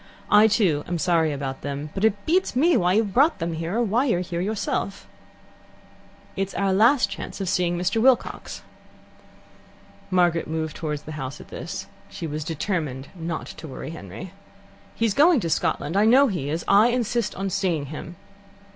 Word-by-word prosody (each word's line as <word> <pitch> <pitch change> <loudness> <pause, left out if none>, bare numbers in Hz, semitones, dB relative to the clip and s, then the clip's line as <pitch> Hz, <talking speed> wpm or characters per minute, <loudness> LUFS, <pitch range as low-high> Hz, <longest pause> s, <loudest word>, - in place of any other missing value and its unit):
"I, 210 +1 +7
too, 185 -9 +2
am 175 - -1
sorry 165 -1 +2
about 135 -2 -4
them, 145 +1 -5
but 195 - -4
it 205 -2 +1
beats 360 -3 +1
me 320 +6 +4
why 180 -5 +3
you've 210 -2 +1
brought 295 +5 +4
them 165 0 -3
here, 165 +4 -3
or 240 - +2
why 230 +5 +1
you're 205 -10 +1
here 175 -1 -3
yourself. 200 0 -2 1.3
"It's 195 0 -3
our 195 -1 +1
last 235 +7 +4
chance - - -7
of 195 - -3
seeing 175 -1 +1
Mr. 180 +6 0
Wilcox." 260 0 +1 1.5
Margaret 175 -3 +2
moved 160 0 -3
towards 150 -2 -4
the 155 - -8
house 130 0 -6
at - - -13
this. - - -6 0.2
She - - -6
was 155 0 -4
determined 155 -4 -3
not 165 -3 -4
to 160 - -9
worry 135 +2 -7
Henry. 160 - -9 0.6
"He's 225 -3 +1
going 305 - +5
to 165 - -2
Scotland. 155 +2 -1
I 205 +2 +4
know 265 +4 +6
he 145 -8 -3
is. 160 +3 -3
I 205 +3 +6
insist 240 -1 -1
on 195 0 -3
seeing 180 -6 0
him." 170 +3 -7
180 Hz, 175 wpm, -24 LUFS, 160-220 Hz, 1.5 s, I